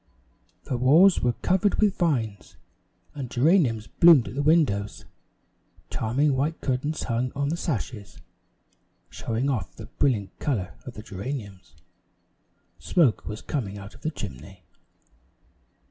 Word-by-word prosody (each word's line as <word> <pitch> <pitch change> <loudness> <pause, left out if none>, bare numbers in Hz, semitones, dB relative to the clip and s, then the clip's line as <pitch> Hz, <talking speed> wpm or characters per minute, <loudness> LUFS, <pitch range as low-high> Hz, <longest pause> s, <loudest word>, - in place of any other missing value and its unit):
The 125 - -3
walls 160 +10 +5
were 120 -1 +1
covered 190 +2 +2
with 210 -3 +2
vines, 120 - -1 0.6
and 135 -4 -6
geraniums 125 - +2
bloomed 165 -4 +6
at - - -9
the 140 - -1
windows. 145 -10 +1 0.9
Charming 135 +6 +1
white 150 +5 -1
curtains 140 +4 -2
hung 120 +1 -1
on 140 +1 -1
the 165 - 0
sashes, 125 - -4 0.9
showing 115 +4 -2
off 130 -5 -2
the 110 - -9
brilliant 110 -5 -1
color 110 -11 -2
of 125 - -8
the 105 - -9
geraniums. 100 - -7 1.0
Smoke 150 -10 +2
was 105 +1 -6
coming 105 -9 -3
out 100 0 -10
of - - -17
the 155 - -1
chimney. 90 - -9
125 Hz, 130 wpm, -25 LUFS, 105-150 Hz, 1.0 s, bloomed